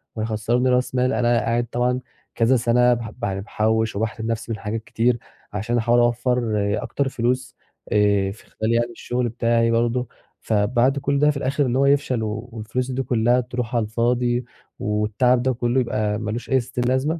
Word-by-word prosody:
وهيخسرّني 110 Hz, +3 st, 0 dB
راس 125 Hz, 0 st, +1 dB
مال 125 Hz, +1 st, +2 dB
أنا 120 Hz, -1 st, +2 dB
قاعد 120 Hz, +1 st, 0 dB
طبعًا 125 Hz, +2 st, 0 dB, 0.4 s
كذا 120 Hz, +3 st, +3 dB
سنة 125 Hz, +1 st, +3 dB
بح 115 Hz, -2 st, -4 dB
يعني 95 Hz, -2 st, -1 dB
باحوش 110 Hz, +1 st, 0 dB
وباحرم 110 Hz, +2 st, -2 dB
نَفسي 115 Hz, 0 st, -3 dB
من 110 Hz, -, -2 dB
حاجات 110 Hz, +1 st, -4 dB
كتير، 120 Hz, +2 st, +1 dB, 0.4 s
عشان 110 Hz, +4 st, -1 dB
أحاول 120 Hz, +1 st, +3 dB
أوفّر 120 Hz, 0 st, +1 dB, 0.3 s
اكتر 140 Hz, -1 st, -1 dB
فلوس 125 Hz, +1 st, -1 dB, 0.4 s
آآ 100 Hz, -2 st, +3 dB
في 105 Hz, -, -14 dB
خلال 110 Hz, +1 st, -2 dB
يعني 120 Hz, +1 st, +1 dB
الشغل 120 Hz, +1 st, -2 dB
بتاعي 115 Hz, 0 st, +1 dB
برضه، 120 Hz, +2 st, +1 dB, 0.3 s
فبعد 120 Hz, +6 st, +2 dB
كل 140 Hz, 0 st, 0 dB
ده 150 Hz, +1 st, +4 dB
في 140 Hz, -, -5 dB
الآخر 140 Hz, +1 st, 0 dB
إن 125 Hz, -1 st, 0 dB
هو 135 Hz, +1 st, +3 dB
يفشل 140 Hz, -4 st, +2 dB
و 110 Hz, +3 st, -4 dB
والفلوس 120 Hz, +3 st, -3 dB
دي 130 Hz, +1 st, -1 dB
كلها 120 Hz, 0 st, +2 dB
تروح 125 Hz, -1 st, -4 dB
على 115 Hz, -, +2 dB
الفاضي 120 Hz, +2 st, 0 dB, 0.3 s
والتعب 105 Hz, +4 st, +1 dB
ده 130 Hz, +1 st, +1 dB
كله 120 Hz, +2 st, 0 dB
يبقى 105 Hz, -3 st, 0 dB
ما 110 Hz, -1 st, -3 dB
لوش 120 Hz, +2 st, -5 dB
أي 135 Hz, -, +4 dB
ستين 125 Hz, 0 st, -3 dB
لازمة، 130 Hz, +6 st, 0 dB
120 Hz, 180 wpm, -22 LUFS, 110-125 Hz, 0.4 s, ده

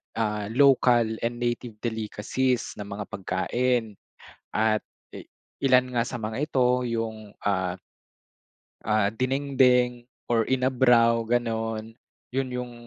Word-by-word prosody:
ah, 105 Hz, -2 st, -1 dB
local 125 Hz, -5 st, +4 dB
and 120 Hz, +1 st, -2 dB
native 120 Hz, -1 st, -3 dB
delicacies 115 Hz, +3 st, -1 dB
na 105 Hz, -, -6 dB
mga 100 Hz, +1 st, -5 dB
pagkain 110 Hz, +4 st, -1 dB, 0.5 s
at, 110 Hz, 0 st, +1 dB, 0.3 s
e -, -, -7 dB, 0.4 s
ilan 130 Hz, -1 st, +4 dB
nga 120 Hz, -, +2 dB
sa 125 Hz, -, -5 dB
mga 110 Hz, 0 st, -4 dB
ito 125 Hz, -4 st, +1 dB
yung, 110 Hz, -3 st, -4 dB
ah 95 Hz, -2 st, 0 dB, 1.1 s
Ah, 105 Hz, -1 st, +2 dB
dinengdeng 125 Hz, 0 st, +2 dB, 0.2 s
or 115 Hz, -2 st, +2 dB
inabraw, 125 Hz, -3 st, +3 dB
gano'n? 115 Hz, -1 st, -2 dB, 0.3 s
Yun 135 Hz, +1 st, -1 dB
yung 125 Hz, -1 st, -4 dB
120 Hz, 110 wpm, -26 LUFS, 110-125 Hz, 1.1 s, local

